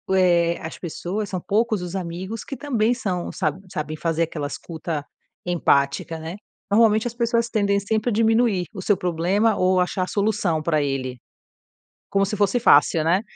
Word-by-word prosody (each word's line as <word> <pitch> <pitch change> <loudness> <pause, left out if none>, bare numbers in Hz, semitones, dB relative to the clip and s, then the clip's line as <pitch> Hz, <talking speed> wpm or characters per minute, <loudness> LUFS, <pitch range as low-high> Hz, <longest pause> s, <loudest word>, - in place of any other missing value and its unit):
eh, 170 -2 +3
as 160 - -7
pessoas 190 +4 -4
são 185 - -3
poucos 215 +1 0
os 180 +1 -5
amigos 190 +4 -5
que 275 - -7
também 245 -5 +1
são 190 -8 -3
sa 160 -6 0 0.2
sabem 155 0 -4
fazer 165 +1 0
aquela 155 -3 -3
escuta 160 -1 -5 0.4
empática, 160 -2 +1
né. 160 +4 -7 0.3
Normalmente 220 +2 +4
as 235 - -5
pessoas 235 -1 +1
tendem 200 -3 +1
sempre 215 +3 -1
a - - 0
diminuir 225 -3 +2
o - - -6
seu 200 +1 +2
problema 180 +6 +1
ou 185 0 +2
achar 180 +1 0
a - - -3
solução 200 -6 0
para 155 -1 +1
ele. 130 -2 -3 0.9
Como 195 0 +2
se 210 +2 -3
fosse 205 +4 +2
fácil, 155 -4 +5
né. 170 +5 +2
185 Hz, 170 wpm, -23 LUFS, 165-215 Hz, 0.9 s, fácil